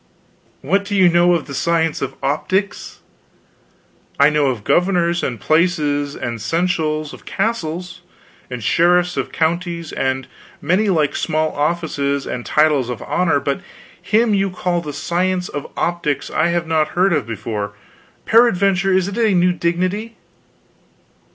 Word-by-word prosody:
"What 195 +8 +1
do 205 0 -4
you 185 -2 +5
know 175 +1 +4
of 165 - -2
the 140 - -8
science 165 +2 0
of - - -3
optics?" 185 +8 -2 1.2
"I 140 +2 +6
know 150 -2 +2
of 120 -6 -2
governors 175 - +2
of 120 -4 -3
places, 150 - +1
and 120 -3 -5
seneschals 155 +1 -1
of - - -14
castles, 180 -5 -3 0.5
and 125 -3 -6
sheriffs 175 +4 +3
of - - -3
counties, 170 0 -2
and 130 0 -1 0.3
many 200 +4 +1
like 155 -6 +1
small 155 0 0
offices 145 -3 -1
and 120 - -4
titles 150 -5 +2
of 125 - -5
honor, 165 -5 +1
but 140 +5 -2 0.4
him 220 +1 +2
you 195 -1 +1
call 180 -1 -1
the 150 -3 -6
Science 180 +5 -1
of 145 - -6
Optics 170 -5 -1
I 155 - +2
have 170 0 0
not 160 0 0
heard 185 0 +4
of 145 -7 -1
before; 105 -2 -4 0.5
peradventure 195 -4 +3
it - - +5
is 190 0 0
a 210 0 +1
new 180 0 +3
dignity." 185 +6 -2
170 Hz, 145 wpm, -19 LUFS, 145-180 Hz, 1.2 s, I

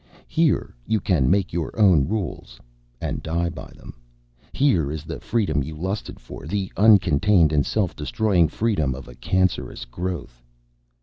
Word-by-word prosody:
Here 160 -2 +1
you 110 - +2
can 85 -9 +1
make 95 -1 +1
your 85 +6 -3
own 90 -10 +5
rules, 85 - -4 0.4
and - - -3
die 85 +1 -1
by - - -9
them. - - -11 0.6
Here 90 - +2
is 75 -1 -5
the 80 0 -6
freedom 95 -11 0
you 80 +3 -6
lusted 95 +6 -4
for; - - -10
the 95 +2 -2
uncontained 95 -4 +5
and 70 -2 +3
self 100 0 -1
destroying 90 +2 +2
freedom 80 - 0
of 65 - -10
a 60 - -11
cancerous 95 +7 -1
growth." 85 -3 -5
90 Hz, 150 wpm, -23 LUFS, 75-100 Hz, 0.6 s, own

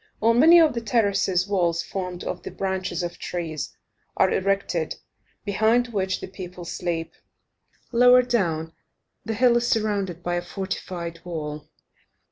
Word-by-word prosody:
On 230 +2 +3
many 330 +5 +8
of 320 -4 +5
the 235 - -3
terraces, 200 -5 +1
walls, 175 -4 +1
formed 180 -2 -5
of - - -4
the - - -7
branches 190 -2 -3
of 175 0 -5
trees, 165 -4 -5 0.4
are - - +4
erected, 190 -4 0 0.5
behind 220 +4 +2
which 190 -4 -1
the - - -5
people 180 -2 -9
sleep. 170 -1 -3 0.8
Lower 250 +1 +6
down, 165 -10 -1 0.5
the 225 - -2
hill 240 +1 +4
is 240 0 0
surrounded 200 -6 -1
by 175 - -1
a - - -1
fortified 175 -2 -5
wall. 155 -4 -6
190 Hz, 140 wpm, -24 LUFS, 175-225 Hz, 0.8 s, many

